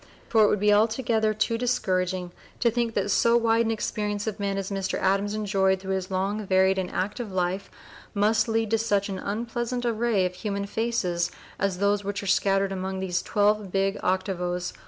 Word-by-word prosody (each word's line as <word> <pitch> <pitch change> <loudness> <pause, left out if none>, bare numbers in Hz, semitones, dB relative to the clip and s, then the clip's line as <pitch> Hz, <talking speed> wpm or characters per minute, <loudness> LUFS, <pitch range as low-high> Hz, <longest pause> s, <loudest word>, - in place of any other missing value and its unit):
For 220 -2 +5
it - - +6
would 210 - +1
be 210 +1 +4
altogether 220 0 +2
too 215 +2 0
discouraging 185 -7 0 0.3
to 235 - +3
think 235 -1 -1
that 200 0 0
so 235 +4 +4
wide 230 0 +2
an - - +1
experience 210 -2 -2
of 220 -1 -4
men 200 -1 -1
as 195 0 -4
Mr. 195 -1 -2
Adams 195 +2 +1
enjoyed 195 -3 +1
through 190 0 -3
his 190 -1 -3
long, 195 +3 -1
varied, 190 0 +3
and 180 -1 -2
active 210 +3 -3
life 185 +1 -1 0.5
must 210 +3 +2
lead 225 -1 0
to 225 - +3
such 205 -3 +1
an 190 -1 -4
unpleasant 240 +4 -3
array 230 -4 +1
of 180 - -2
human 200 +1 -3
faces 200 -6 -1
(p. - - -19 0.2
010) 200 - +2
as 190 -2 -5
those 200 +1 +1
which 200 0 -3
are - - -6
scattered 195 0 +2
along 190 0 -3
these 180 -2 -1
twelve 210 -1 +1
big 195 +1 +1
octavos. 180 -1 -1
200 Hz, 200 wpm, -26 LUFS, 190-220 Hz, 0.5 s, it